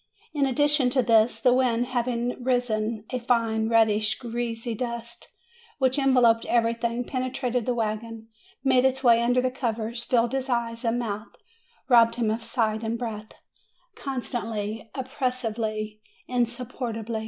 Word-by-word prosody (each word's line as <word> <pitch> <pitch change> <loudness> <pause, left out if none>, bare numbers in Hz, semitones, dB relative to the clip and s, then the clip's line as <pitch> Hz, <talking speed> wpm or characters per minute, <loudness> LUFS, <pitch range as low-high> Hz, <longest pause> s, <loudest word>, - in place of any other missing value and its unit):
In 285 -3 +2
addition 290 0 +3
to 255 0 +2
this, 225 0 +3
the 250 -2 +4
wind 245 -2 +2
having 245 0 -2
risen, 230 -4 0
a 255 - -1
fine, 230 -2 +1
reddish, 220 -1 +3
greasy 235 -1 -3
dust, 235 0 -6 0.5
which 265 0 +2
en 270 -1 +3
veloped 230 -2 +5
everything, 235 +1 0
penetrated 255 -2 -2
the 250 - +1
wagon, 225 0 -3 0.4
made 260 -2 +4
its 265 0 +1
way 235 -2 +6
under 245 +1 +2
the 255 - +1
covers, 235 -2 -3
filled 235 -1 +2
his 270 0 -2
eyes 230 -1 -1
and 230 0 +1
mouth,, 215 -2 -4 0.5
robbed 230 -2 +5
him 230 -3 0
of 225 +1 -3
sight 220 -2 0
and 225 +1 -2
breath, 215 -3 -6 0.6
constantly, 225 -5 -4
op 260 -2 -4
pressively, 220 -5 -2 0.3
insupportably. 240 -2 -2
235 Hz, 140 wpm, -26 LUFS, 225-250 Hz, 0.6 s, way